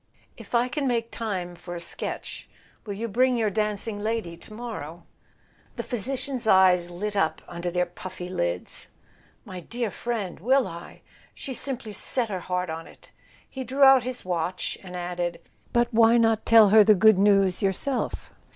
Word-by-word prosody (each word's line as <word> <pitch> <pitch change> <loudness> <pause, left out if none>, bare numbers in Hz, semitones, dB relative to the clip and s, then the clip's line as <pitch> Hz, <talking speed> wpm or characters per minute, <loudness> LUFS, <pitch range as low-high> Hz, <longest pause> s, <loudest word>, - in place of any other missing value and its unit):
"If - - -7
I 240 +1 +3
can 275 +2 -2
make 235 -2 -1
time 185 -6 -4
for 175 0 -8
a - - -5
sketch—will 200 +4 -6
you 230 +3 -3
bring 250 +3 +2
your 220 -3 +1
dancing 210 0 -2
lady 215 -5 -2
to 170 - -16
morrow?" 215 -8 -7 0.7
The - - -4
physician's 255 +1 -3
eyes 185 -3 +5
lit 205 +4 -4
up 160 -5 0
under 175 0 -4
their 180 0 0
puffy 180 0 -8
lids. 90 - -2 0.6
"My 185 -1 -7
dear 235 +4 -4
friend—will 235 +3 0
I? 170 +1 -10 0.3
She's 265 -3 -5
simply 250 -6 -4
set 235 +3 -1
her 190 -3 -3
heart 180 -1 -2
on 165 0 -6
it!" - - -17 0.4
He 265 - -6
drew 265 +3 +1
out 270 -1 +8
his 250 -2 -4
watch 180 0 -2
and 180 -2 -9
added: 175 -1 -3 0.3
"But 240 0 +3
why 230 +1 +6
not 225 -1 +2
tell 225 -3 +8
her 215 +1 +8
the 215 0 +6
good 215 +1 +5
news 195 -2 +4
yourself? 210 +7 -2
210 Hz, 165 wpm, -26 LUFS, 180-235 Hz, 0.7 s, out